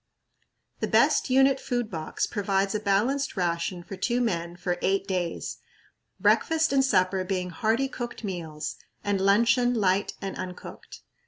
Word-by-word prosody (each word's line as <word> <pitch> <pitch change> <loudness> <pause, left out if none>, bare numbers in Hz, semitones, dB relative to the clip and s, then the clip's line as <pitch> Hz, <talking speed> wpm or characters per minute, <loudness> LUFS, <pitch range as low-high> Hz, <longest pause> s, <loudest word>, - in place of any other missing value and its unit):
The - - -1
best - - +3
unit 270 +1 +4
food 245 -4 -2
box 160 -3 -2
provides 195 -1 0
a 215 - 0
balanced 220 +7 0
ration 175 0 -1
for 190 +3 -8
two 240 +5 0
men 170 -7 -1
for 175 0 -2
eight 195 +1 +1
days, 180 -3 -3 0.6
breakfast 320 -3 +3
and 270 -1 +4
supper 190 -6 +2
being 185 -1 -2
hearty, 225 +9 +1
cooked 240 -3 -6
meals, 160 -6 -5 0.3
and 200 -1 0
luncheon 235 +5 +3
light 195 -2 +1
and 195 -1 -5
uncooked. 180 -1 -8
195 Hz, 145 wpm, -27 LUFS, 180-240 Hz, 0.6 s, unit